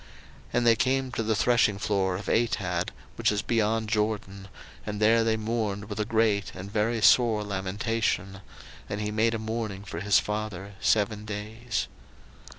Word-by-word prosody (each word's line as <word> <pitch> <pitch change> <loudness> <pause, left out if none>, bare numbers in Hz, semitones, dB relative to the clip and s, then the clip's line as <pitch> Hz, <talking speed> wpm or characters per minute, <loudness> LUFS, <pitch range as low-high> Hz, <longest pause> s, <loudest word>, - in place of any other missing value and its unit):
01:050:010 - - -20 0.4
And 120 0 +2
they 115 -1 +6
came 130 +3 0
to 120 - -2
the 110 0 0
threshingfloor 100 -5 +2
of 100 - -8
Atad, 95 -7 0 0.3
which - - +2
is 100 -1 -1
beyond 110 -1 +1
Jordan, 105 -3 -2 0.4
and 105 -1 -4
there 115 +2 +4
they 110 0 +1
mourned 110 -2 -2
with 105 0 -5
a 105 - +1
great 110 -2 +1
and 95 +2 -8
very 110 +1 0
sore 115 -4 +5
lamentation: 100 0 -2 0.5
and 100 - -3
he 105 0 -2
made 115 +2 +2
a - - -1
mourning 110 -3 -4
for 85 -5 -6
his 100 +2 +4
father 105 -2 -3
seven 105 0 +1
days. 110 - -4
105 Hz, 160 wpm, -27 LUFS, 100-115 Hz, 0.5 s, they